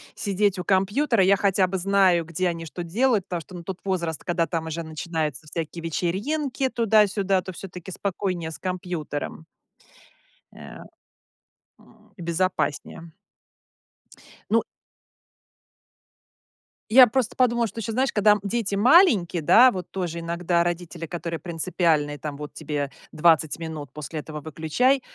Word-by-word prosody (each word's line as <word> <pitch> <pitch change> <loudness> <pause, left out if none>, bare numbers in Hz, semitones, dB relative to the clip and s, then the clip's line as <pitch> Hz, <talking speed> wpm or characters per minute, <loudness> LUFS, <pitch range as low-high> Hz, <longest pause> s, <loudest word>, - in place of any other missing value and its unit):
сидеть 200 -1 0
у 180 - -3
компьютера. 200 +5 +2
Я 195 +2 +4
хотя 195 -2 +2
бы 190 - -2
знаю, 185 -2 +3
где 170 +3 -1
они 165 -1 -5
что 175 +2 -6
делают, 215 +3 +1
потому 175 -2 -4
что, 185 - -13
ну, 175 - -8
тут 185 +1 -6
возраст, 170 -5 -2
когда 170 -2 0
там 165 -2 -3
уже 160 +1 -4
начинается 160 -1 -4
всякие 165 +1 -5
вечеринки 255 - -1
туда-сюда, 210 -5 +2
то 185 - -7
всё-таки 185 0 -9
спокойнее 180 -3 -3
с - - -8
компьютером. 175 -5 -5 1.1
Э, - - -17
а, - - -11 0.9
м, - - -23
безопаснее. 170 -2 -2 1.4
Ну - - +4 2.3
Я 250 +2 +9
просто 240 0 -1
подумала, 240 -2 +2
что 220 +2 -8
ещё, 225 +1 -4
знаешь, 260 +3 +1
когда, 210 0 +5
м, 210 - -1
дети 205 -1 -1
маленькие, 215 - +5
да, 245 - +7
вот 185 -4 -6
тоже 175 -3 -4
иногда 170 +1 0
родители, 175 -1 -4
которые 170 0 -5
принципиальные, 160 -3 0
там: 150 -2 -5
"Вот 150 0 -8
тебе 145 -3 -3 0.2
20 160 -1 +3
минут, 160 -4 -7
после 150 +1 -6
этого 150 0 -7
выключай". 165 - +1
180 Hz, 140 wpm, -24 LUFS, 165-200 Hz, 2.3 s, Я